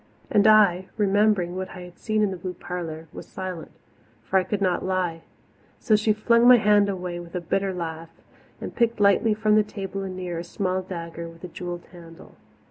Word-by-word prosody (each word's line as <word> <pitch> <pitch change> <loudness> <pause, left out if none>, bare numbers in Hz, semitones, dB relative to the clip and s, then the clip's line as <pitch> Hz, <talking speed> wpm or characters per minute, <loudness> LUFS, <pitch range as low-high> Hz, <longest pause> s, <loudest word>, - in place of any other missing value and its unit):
And 205 +1 +4
I, 200 -4 +5
remembering 205 -3 +2
what 185 0 -4
I 180 - -8
had 180 0 -12
seen 215 -1 0
in 205 - +1
the 185 - -5
blue 180 +1 -6
parlour, 165 -2 -6
was - - -9
silent 185 -3 -6 0.5
for 190 - +2
I - - 0
could 200 +2 -2
not 185 -3 0
lie. 180 -3 -1 0.6
So 215 - +3
she 215 +1 +2
flung 235 +3 +3
my 250 0 +9
hand 210 -2 +4
away 180 -2 -4
with 170 0 -10
a - - 0
bitter 195 +3 -1
laugh, 165 -2 -5 0.5
and - - -6
picked 235 -1 +1
lightly 205 +2 +4
from 215 0 +2
the - - +6
table 195 -2 -6
anear 185 -3 -5
a - - -5
small 185 +1 -2
dagger 170 -2 -7
with 165 +1 -16
a - - -5
jewelled 175 0 -6
handle. 165 -2 -14
185 Hz, 200 wpm, -24 LUFS, 175-210 Hz, 0.6 s, my